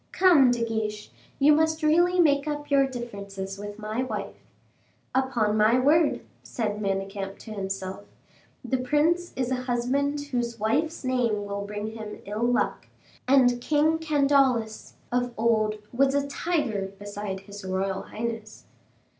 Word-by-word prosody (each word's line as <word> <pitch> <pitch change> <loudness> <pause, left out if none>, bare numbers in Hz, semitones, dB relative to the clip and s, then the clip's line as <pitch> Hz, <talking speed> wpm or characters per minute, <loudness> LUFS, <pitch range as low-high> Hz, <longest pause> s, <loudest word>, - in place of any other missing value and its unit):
Come, 340 -9 +6
De 240 -1 +1
Guiche, 215 -2 -3 0.3
you 290 +2 +6
must 315 +1 +1
really 345 +4 +4
make 285 -3 +4
up 295 -1 -4
your 275 -1 +5
differences 200 -6 -6
with 205 0 -7
my 215 +3 -3
wife." 215 -6 -4 0.8
"Upon 245 -5 +1
my 215 +3 +4
word," 295 +4 +3 0.2
said 210 -3 -3
Manicamp 195 0 -3
to 220 - -11
himself, 195 0 -5 0.6
"the 255 +1 0
prince 315 +7 +1
is 255 -1 -2
a - - +2
husband 270 +4 0
whose 240 -5 -3
wife's 295 +11 0
name 240 -5 0
will 200 0 -4
bring 210 +1 -5
him 220 -1 -7
ill 210 +2 -4
luck, 245 0 0 0.4
and 250 -2 +4
King 310 +4 +2
Candaules, 275 -7 +1 0.2
of 245 0 0
old, 220 -1 +2 0.2
was 270 +2 +3
a 285 0 +1
tiger 260 - -2
beside 205 -1 -5
his 200 +1 -10
royal 190 +1 -2
highness." 225 -1 -6
240 Hz, 140 wpm, -26 LUFS, 210-280 Hz, 0.8 s, Come